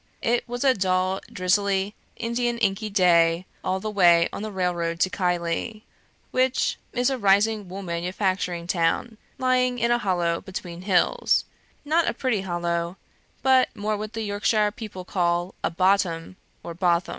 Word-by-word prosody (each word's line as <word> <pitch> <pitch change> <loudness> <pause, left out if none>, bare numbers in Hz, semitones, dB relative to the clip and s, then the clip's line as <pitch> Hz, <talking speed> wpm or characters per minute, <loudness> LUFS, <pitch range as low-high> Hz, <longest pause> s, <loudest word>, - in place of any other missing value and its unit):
"It 240 +1 0
was 245 +1 -3
a 265 -2 +5
dull, 185 -2 0
drizzly 195 +2 +1 0.2
Indian 240 +1 -1
inky 215 0 0
day, 175 -3 +3 0.2
all 185 +1 -1
the 215 +2 -4
way 175 -4 +5
on - - -5
the 215 0 -4
railroad 175 -3 -1
to 185 - +3
Keighley, 180 +4 -2 0.5
which 255 0 +1
is 245 +2 +1
a 265 - -2
rising 205 0 +2
wool 195 +2 -6
manufacturing 180 0 -2
town, 180 +6 0 0.2
lying 255 -1 +1
in 235 0 +1
a 240 - +3
hollow 175 -5 0
between 175 -2 -7
hills 200 - +2 0.4
not 320 +3 +2
a - - -4
pretty 245 -7 0
hollow, 175 -1 -2 0.5
but 260 -1 +4
more 210 +1 -1
what 215 +1 -6
the 225 -1 -3
Yorkshire 210 +1 +1
people 205 -4 -8
call 175 0 0
a - - +2
'bottom,' 185 -1 +1 0.3
or 170 - -6
'botham.' 175 0 +1
195 Hz, 155 wpm, -24 LUFS, 175-220 Hz, 0.5 s, a